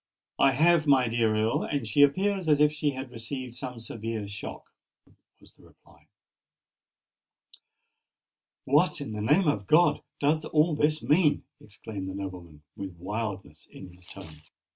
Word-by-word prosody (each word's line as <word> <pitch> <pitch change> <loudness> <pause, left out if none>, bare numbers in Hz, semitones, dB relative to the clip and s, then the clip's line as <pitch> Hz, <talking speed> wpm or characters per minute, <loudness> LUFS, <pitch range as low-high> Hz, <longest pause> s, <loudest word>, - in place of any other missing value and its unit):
"I 135 - +5
have, 160 +3 +3
my 130 -3 +4
dear 115 -2 +1
Earl; 110 +1 +1
and 140 -5 -3
she 110 +7 +2
appears 185 +5 +2
as 150 -1 +4
if 150 0 +5
she 150 -1 -1
had 130 -1 -7
received 125 +1 -7
some 125 -2 -7
severe 115 -2 -5
shock," 100 0 -8 0.7
was - - -20
the - - -24
reply. - - -23 2.6
"What, - - +2
in - - -6
the 105 - -4
name 170 - +3
of 100 -9 0
God! 170 +3 +4 0.2
does 155 +2 +1
all 155 +1 +2
this 150 +1 +1
mean?" 150 -1 +3 0.2
exclaimed 100 -2 -8
the 95 - -6
nobleman, 90 -6 -8
with 95 -3 -8
wildness 95 -4 -6
in 90 -2 -12
his 90 -1 -18
tone. 75 -1 -12
115 Hz, 150 wpm, -27 LUFS, 100-150 Hz, 2.6 s, I